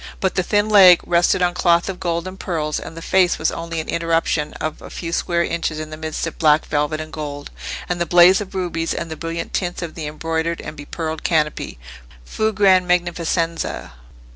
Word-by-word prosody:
But 190 Hz, -, 0 dB
the 185 Hz, -, +1 dB
thin 205 Hz, +3 st, +1 dB
leg 190 Hz, -5 st, +8 dB
rested 175 Hz, +1 st, +2 dB
on 175 Hz, 0 st, +2 dB
cloth 170 Hz, -1 st, +2 dB
of 190 Hz, -2 st, -5 dB
gold 170 Hz, -1 st, -2 dB
and 190 Hz, +1 st, -8 dB
pearls, 155 Hz, -4 st, -2 dB
and 160 Hz, -, -9 dB
the 165 Hz, -, -7 dB
face 185 Hz, -2 st, +3 dB
was 160 Hz, -, 0 dB
only 165 Hz, 0 st, -4 dB
an 160 Hz, -, -5 dB
interruption 165 Hz, -2 st, 0 dB
of 155 Hz, -, -5 dB
a -, -, -10 dB
few 165 Hz, -1 st, -6 dB
square 170 Hz, 0 st, +1 dB
inches 165 Hz, -2 st, -2 dB
in 155 Hz, 0 st, -6 dB
the -, -, -5 dB
midst 155 Hz, 0 st, -4 dB
of 165 Hz, -, -7 dB
black 155 Hz, -1 st, +4 dB
velvet 150 Hz, +1 st, -1 dB
and 155 Hz, 0 st, -7 dB
gold, 145 Hz, -2 st, -6 dB, 0.4 s
and 175 Hz, -1 st, -2 dB
the 170 Hz, -, 0 dB
blaze 180 Hz, +3 st, +6 dB
of 195 Hz, -1 st, -8 dB
rubies, 170 Hz, -3 st, -2 dB
and 165 Hz, -, -4 dB
the -, -, -3 dB
brilliant 165 Hz, +1 st, -5 dB
tints 180 Hz, -1 st, -2 dB
of 165 Hz, -2 st, -6 dB
the 155 Hz, -3 st, -5 dB
embroidered 160 Hz, +2 st, -2 dB
and 150 Hz, -, -7 dB
bepearled 160 Hz, +2 st, -5 dB
canopy,—"fù 65 Hz, -, -2 dB
gran 185 Hz, -2 st, +4 dB
magnificenza." 170 Hz, -1 st, -1 dB
165 Hz, 200 wpm, -20 LUFS, 155-180 Hz, 0.4 s, leg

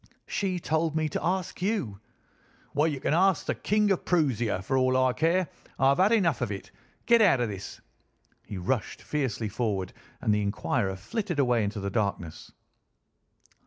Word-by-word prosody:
"She 185 Hz, -3 st, -1 dB
told 160 Hz, -1 st, 0 dB
me 160 Hz, -1 st, +1 dB
to -, -, -3 dB
ask 180 Hz, 0 st, -2 dB
you." 180 Hz, -, -1 dB, 0.7 s
"Well, 150 Hz, +3 st, +3 dB
you 145 Hz, -4 st, -2 dB
can 145 Hz, -, 0 dB
ask 190 Hz, +2 st, +3 dB
the -, -, 0 dB
King 210 Hz, 0 st, +1 dB
of 190 Hz, -, 0 dB
Proosia, 120 Hz, -, +1 dB
for 135 Hz, -, -1 dB
all 130 Hz, 0 st, +3 dB
I 130 Hz, -1 st, +3 dB
care. 170 Hz, +4 st, +1 dB, 0.3 s
I've 135 Hz, +2 st, +3 dB
had 195 Hz, +4 st, +5 dB
enough 175 Hz, -, +2 dB
of -, -, -1 dB
it. 100 Hz, -, -7 dB, 0.3 s
Get 235 Hz, -1 st, +5 dB
out 185 Hz, -, +5 dB
of 120 Hz, -2 st, 0 dB
this!" 100 Hz, -2 st, -7 dB, 0.7 s
He 100 Hz, -, -6 dB
rushed 105 Hz, +6 st, -2 dB
fiercely 130 Hz, -7 st, -2 dB
forward, 100 Hz, -4 st, -2 dB, 0.3 s
and 105 Hz, -, +1 dB
the 105 Hz, -, +1 dB
inquirer 100 Hz, -1 st, -1 dB
flitted 185 Hz, -, -4 dB
away 125 Hz, -5 st, +3 dB
into 105 Hz, +1 st, -3 dB
the 100 Hz, 0 st, -3 dB
darkness. 100 Hz, -6 st, -3 dB
135 Hz, 170 wpm, -28 LUFS, 105-175 Hz, 0.7 s, had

